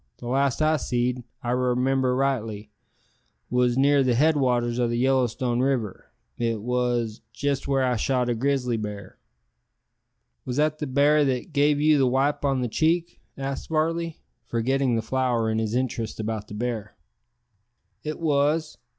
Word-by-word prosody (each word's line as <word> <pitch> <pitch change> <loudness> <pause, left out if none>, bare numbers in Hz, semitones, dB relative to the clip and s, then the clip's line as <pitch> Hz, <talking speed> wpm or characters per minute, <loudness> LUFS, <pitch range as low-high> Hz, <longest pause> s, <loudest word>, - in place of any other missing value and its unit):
The - - -11
last 135 +3 +1
I 155 0 +3
seed, 125 -1 -1
if 120 - -12 0.2
I 120 - -1
remimber 125 +1 +1
rightly, 110 -6 -2 0.8
wos 125 0 +2
near 140 +1 +4
the 125 -2 +2
head 155 +5 +4
waters 125 -3 +1
o' 120 - +2
the 120 - -1
Yellowstone 125 -1 +1
River, 125 -6 -1 0.3
it 115 -3 -1
wos 120 -2 -1
jest 140 -1 -2
where 135 -1 +2
I 125 -2 +1
shot 125 +2 0
a 120 - +1
grizzly 125 -1 0
bar." 105 -3 -7 1.2
"Was 125 0 -4
that 155 0 +1
the 150 - -3
bar 145 +3 +4
that 130 +4 -2
gave 145 0 +3
you 150 0 +4
the 135 - +4
wipe 135 +4 +1
on 135 -2 +1
the 125 - 0
cheek?" 165 +7 0 0.2
asked 135 0 -4
Varley, 165 +1 -1 0.3
forgetting 130 +2 +1
the 115 - -1
flower 120 -2 0
in 110 - 0
his 110 +1 -1
interest 120 -4 -2
about 110 -1 -3
the 105 - -8
bear. 110 -2 -4 1.1
"It 155 0 -4
wos. 155 0 +1
130 Hz, 160 wpm, -25 LUFS, 120-140 Hz, 1.2 s, near